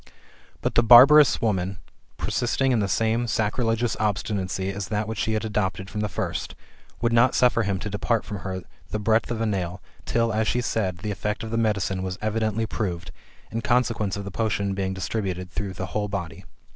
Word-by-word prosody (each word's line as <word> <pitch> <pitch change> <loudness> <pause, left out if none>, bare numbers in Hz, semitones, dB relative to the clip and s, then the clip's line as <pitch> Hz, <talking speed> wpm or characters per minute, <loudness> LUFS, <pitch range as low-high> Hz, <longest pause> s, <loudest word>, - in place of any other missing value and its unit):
But - - -1
the - - +5
barbarous 130 +5 +8
woman, 95 -4 0 0.4
persisting 130 +2 0
in 120 - +2
the 100 - +1
same 115 +3 +1
sacrilegious 115 +1 0
obstinacy 95 -2 -1
as 100 -1 -5
that 105 +1 -2
which 110 -1 -4
she 110 - 0
had 110 +1 -1
adopted 100 -2 -2
from 105 - -3
the 105 - -1
first, - - -4 0.5
would 115 0 +1
not 120 +2 +4
suffer 125 -2 +4
him 100 -3 0
to 100 - -5
depart 105 +2 -1
from 105 - -5
her 95 0 -5 0.3
the - - -2
breadth 110 +2 +1
of 115 -2 -2
a - - +1
nail, 95 -4 -2 0.3
till, 115 -1 +1
as 110 0 +1
she 125 - +1
said, 100 -6 -1
the 105 -1 -1
eRect 105 +2 -3
of 110 - -6
the - - -1
medicine 100 -4 0
was 95 -1 -4
evidently 110 0 -1
proved, 90 -6 -4 0.4
in 115 - -2
consequence 115 -6 +1
of 100 - -5
the 100 - -6
potion 100 -2 -1
being 95 -1 -2
distributed 95 -2 -3
through 100 -1 -4
the 95 +1 -4
whole 105 -1 0
body. 95 -6 -5
105 Hz, 195 wpm, -25 LUFS, 95-115 Hz, 0.5 s, barbarous